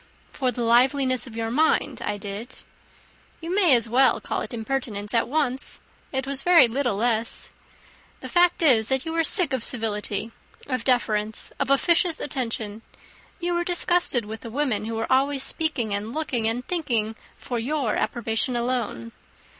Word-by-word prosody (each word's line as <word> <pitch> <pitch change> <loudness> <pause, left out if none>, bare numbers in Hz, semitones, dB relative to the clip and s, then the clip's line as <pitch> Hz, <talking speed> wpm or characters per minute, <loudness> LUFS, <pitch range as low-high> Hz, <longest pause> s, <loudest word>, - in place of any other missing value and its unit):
"For 260 -2 -1
the 245 -1 -4
liveliness 255 +2 +3
of 230 - -11
your 225 0 -2
mind 310 +6 +1
I 205 - -2
did." 205 +4 -7 0.8
"You 335 +1 -5
may 365 -9 +5
as 235 -1 +2
well 255 +4 +3
call - - -3
it - - -6
impertinence 225 -3 -3
at 230 - +2
once. 270 -2 0 0.3
It 265 -1 -2
was 275 0 0
very 345 -8 +6
little 245 -1 -1
less. 225 +1 -1 0.7
The - - -7
fact 350 -1 +3
is, 230 -8 +4
that 265 0 0
you 325 - -3
were 330 0 +2
sick 330 -4 +3
of 255 -3 -1
civility, 220 -2 -1 0.3
of 255 -4 -3
deference, 220 -4 0
of 280 -1 -1
officious 330 +4 +3
attention. 225 -6 -4 0.6
You 350 0 -1
were 345 0 0
disgusted 345 - +1
with 220 +1 -7
the 230 - -8
women 240 -5 -1
who 225 0 -4
were 225 0 -3
always 270 +1 +2
speaking, 280 -10 -1
and 205 +2 -3
looking, 255 -8 -1
and 240 +3 -2
thinking 235 -11 -1 0.2
for 240 -2 -4
your 260 -1 -1
approbation 235 +1 -1
alone. 235 - -2
250 Hz, 165 wpm, -24 LUFS, 225-285 Hz, 0.8 s, very